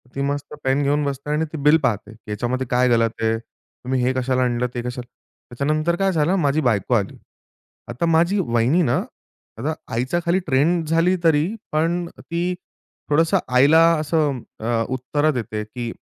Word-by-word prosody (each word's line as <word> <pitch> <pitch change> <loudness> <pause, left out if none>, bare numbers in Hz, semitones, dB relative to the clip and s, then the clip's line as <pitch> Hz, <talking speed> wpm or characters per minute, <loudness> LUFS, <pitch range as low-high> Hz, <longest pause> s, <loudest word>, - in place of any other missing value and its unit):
ती 140 - -2
मस्त 145 +1 -3
पेन 135 +2 +1
घेऊन 145 +1 +1
बसते 140 +1 -4
आणि 155 +2 +1
ती - - -3
बिल 150 +2 +6
पाहते, 105 -1 -1
की 110 -1 -12
याच्यामध्ये 125 +5 -2
काय 125 +1 +2
गलत 115 -1 +2
आहे, 115 0 +1
तुम्ही 125 +2 -6
हे 130 +1 +2
कशाला 130 0 0
आणलं 125 0 0
ते 120 - -3
कशाला 125 0 -6 0.4
त्याच्यानंतर 155 +6 0
काय 195 +1 +1
झालं 165 +3 +1
माझी 150 -3 +1
बायको 115 -2 +1
आली. 105 -5 0 0.7
आता 120 +8 -2
माझी 170 +4 +2
वहिनी 120 +2 +2
ना, 120 - +1 0.6
आता 155 +2 -2 0.2
आईच्या 130 +9 0
खाली 170 +2 +2
ट्रेंन 160 +5 +2
झाली 165 +4 +2
तरी 155 -1 +4 0.3
पण 170 +3 0
ती 170 +2 -2 0.6
थोडंसं 165 +6 +3 0.2
आईला 145 +6 +6 0.2
असं 150 -3 0 0.2
अ, 115 0 0
उत्तर 130 +4 0
देते 110 -5 -4
की 120 +2 -6
140 Hz, 170 wpm, -21 LUFS, 120-160 Hz, 0.7 s, बिल